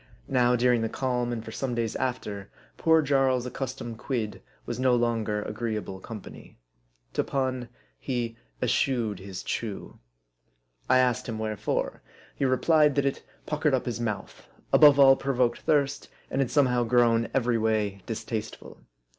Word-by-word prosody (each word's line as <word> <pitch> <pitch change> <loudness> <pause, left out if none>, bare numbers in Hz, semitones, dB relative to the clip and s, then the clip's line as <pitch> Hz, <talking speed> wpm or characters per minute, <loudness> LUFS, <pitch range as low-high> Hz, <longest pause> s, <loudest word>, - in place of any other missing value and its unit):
Now 125 -2 +3
during 125 -1 +3
the 115 - -1
calm, 125 -1 -1
and 115 -2 -4
for 110 - -7
some 125 +1 -3
days 115 -2 -1
after, 105 -6 -3 0.3
poor 160 -1 +4
Jarl's 135 -3 +2
ac 125 - -6
customed 125 -4 -5
quid 115 -6 -3 0.2
was - - -4
no 130 -1 +3
longer 115 -3 0
agreeable 105 -3 -4
company. 105 +1 -10 0.6
To - - +1
pun: 130 -3 -2 0.3
he 120 -3 -3 0.3
eschewed 115 -7 +1
his 95 -1 -7
chew. 110 -4 -5 0.9
I 130 - +6
asked 125 -1 +1
him 110 - -3
wherefore. 110 -1 -2 0.3
He 140 - 0
re 130 0 +2
plied 150 -3 +4
that 140 -1 +2
it 135 - -1 0.2
puckered 150 -2 +1
up 130 - -2
his 120 -1 -3
mouth, 105 -3 -5 0.3
above 145 -2 +8
all 135 -1 +8
provoked 130 -3 0
thirst, 145 -2 0 0.2
and 135 - +1
had 130 - 0
somehow 125 -4 +3
grown 115 -1 +3
every 120 -3 +2
way 105 -3 0
distasteful. 110 -1 -5
120 Hz, 155 wpm, -27 LUFS, 110-135 Hz, 0.9 s, above